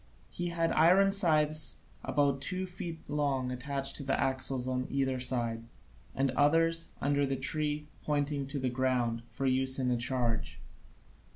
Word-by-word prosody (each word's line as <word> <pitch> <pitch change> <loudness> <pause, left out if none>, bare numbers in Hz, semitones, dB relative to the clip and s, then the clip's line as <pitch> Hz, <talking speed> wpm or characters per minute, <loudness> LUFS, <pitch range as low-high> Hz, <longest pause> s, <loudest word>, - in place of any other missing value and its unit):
He 175 - -3
had 165 -1 0
iron 185 +5 +5
scythes 155 -5 +2 0.2
about 140 -2 +1
two 185 +7 -2
feet 175 -3 -7
long 140 -3 0
attached 135 +2 -2
to 145 - -6
the 135 0 0
axles 130 -1 0
on 130 0 -1
either 135 -2 0
side, 120 -3 -1 0.5
and 135 0 +1
others, 165 +4 +2
under 145 0 +1
the 135 -1 0
tree, 150 +2 0 0.2
pointing 145 -1 -1
to 140 +1 -4
the 130 -2 -1
ground, 125 -2 0
for 135 - -4
use 130 0 +2
in 130 -2 0
a 120 - +1
charge. 120 -2 -1
135 Hz, 155 wpm, -31 LUFS, 130-155 Hz, 0.5 s, iron